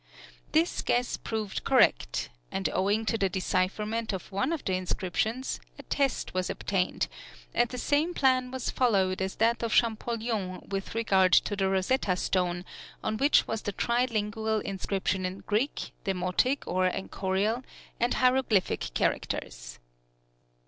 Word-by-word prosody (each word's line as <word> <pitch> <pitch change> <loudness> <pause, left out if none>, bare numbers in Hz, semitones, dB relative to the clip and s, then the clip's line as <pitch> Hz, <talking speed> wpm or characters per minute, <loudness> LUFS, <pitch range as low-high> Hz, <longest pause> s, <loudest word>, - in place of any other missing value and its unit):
This 325 +3 +2
guess 245 0 +1
proved 220 -3 -4
correct; - - +3 0.2
and 190 0 0
owing 205 +4 +1
to 225 +1 0
the 195 - +2
decipherment 210 +4 -1
of 190 - -6
one 255 +10 0
of 330 - -3
the 190 - 0
inscriptions, 185 +7 -1 0.2
a - - -10
test 275 -2 -1
was 185 0 -1
obtained, 185 -2 -1 0.5
and 240 -1 +2
the 250 - -6
same 300 +7 +1
plan 255 -2 +3
was 260 -1 -3
followed 190 -7 +2
as 190 0 -2
that 230 +1 +2
of 230 -1 -1
Champollion 220 -4 0
with 195 +2 -4
regard 190 -5 +3
to 205 - +4
the 195 -1 +1
Rosetta 190 +1 +1
stone, 180 -1 0 0.4
on 215 0 -1
which 280 +5 +4
was 225 -1 -2
the 205 - -3
tri 240 +5 +1
lingual 220 -1 -1
inscription 195 -1 -2
in 185 +1 -4
Greek, 220 +7 -1
Demotic 190 +8 0
or 185 +1 +1
Enchorial, 195 +5 -1 0.4
and 240 +1 +1
hieroglyphic 250 - +2
characters. - - -2
210 Hz, 140 wpm, -29 LUFS, 190-240 Hz, 0.5 s, to